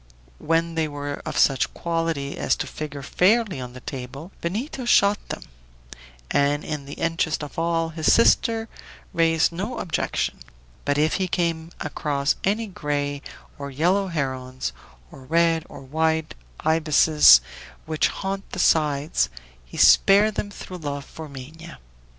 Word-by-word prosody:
When 165 +1 0
they 160 -1 0
were 145 -1 -5
of - - -3
such 135 -2 +3
quality 165 -4 -2
as - - +1
to - - -3
figure 145 -2 -7
fairly 195 - +2
on 125 -1 -7
the 125 - -10
table, 135 +7 -7
Benito 235 - -3
shot 205 -3 +4
them; - - -5 0.9
and, 145 +1 +1
in 150 -2 -4
the 140 - -8
interest 165 -2 -1
of 145 +2 -6
all, 165 0 0
his 160 -1 +1
sister 230 -1 +3 0.5
raised 165 0 +3
no 195 +8 -4
objection; 170 - -2 0.5
but 145 0 +1
if 155 +1 +2
he 185 - +1
came 170 -2 -1
across 145 -1 -1
any 210 +4 +1
gray 145 -6 -3 0.4
or 140 0 -5
yellow 180 +8 +1
herons, 130 - -3 0.4
or - - -12
red 165 +3 +2
or - - -10
white 160 +3 0 0.3
ibises, 155 - +6 0.5
which 155 -1 +1
haunt 195 0 -5
the - - -4
sides, 150 - +2 0.3
he - - -12
spared 200 - +6
them 205 - -3
through 185 -2 -9
love 145 -4 -5
for 160 -1 -10
Minha. 155 +5 -10
160 Hz, 145 wpm, -24 LUFS, 145-170 Hz, 0.9 s, ibises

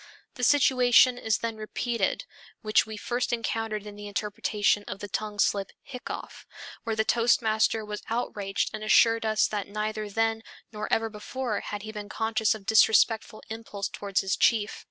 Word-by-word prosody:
The 250 - -7
situation 255 -2 +5
is 220 -3 +1
then 230 -1 -4
repeated 230 - -2 0.4
which 215 0 +3
we 220 -1 -7
first 240 +3 -2
encountered 225 -2 -2
in 205 -1 -9
the 205 0 -8
interpretation 205 0 0
of - - -5
the 205 - -7
tongue 210 +1 -4
slip 200 -1 +1
"hiccough" 250 -3 -8 0.4
where 225 -1 -2
the 220 0 +1
toastmaster 225 -2 +2
was 210 0 -6
outraged 205 -4 -2
and 215 - -5
assured 225 +1 +4
us 215 -1 +3
that 205 -2 -3
neither 215 0 -3
then 225 +1 0 0.3
nor 215 -1 -5
ever 225 0 +1
before 215 +1 -4
had 205 -1 -6
he 215 - -6
been 210 -1 -7
conscious 220 0 +1
of 205 -3 -11
disrespectful 220 0 +3
impulse 215 -3 -5
toward 200 -2 -6
his 190 -1 +2
chief. 220 -2 +2
215 Hz, 165 wpm, -27 LUFS, 210-230 Hz, 0.4 s, situation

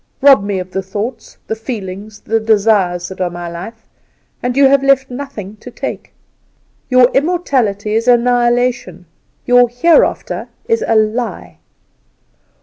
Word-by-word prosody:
Rob 270 -6 +6
me 200 -1 -2
of 185 0 -6
the 190 - -2
thoughts, 210 +5 -6
the 220 - -3
feelings, 210 -2 -7
the 225 +1 0
desires 205 -5 +1
that 190 0 -8
are 180 - 0
my 175 0 -7
life, 220 +7 -9 0.6
and 245 +1 -2
you 280 - +6
have 275 0 +3
left 275 -1 +2
nothing 245 -7 -7
to 250 - -11
take. - - -6 0.8
Your 255 -1 +5
immortality 260 - 0
is 225 +2 0
annihilation, 240 -6 +1 0.4
your 245 -1 +4
Hereafter 310 +8 +1 0.2
is 455 0 +1
a 225 - +2
lie. 220 +3 -1
225 Hz, 140 wpm, -15 LUFS, 200-250 Hz, 0.8 s, Rob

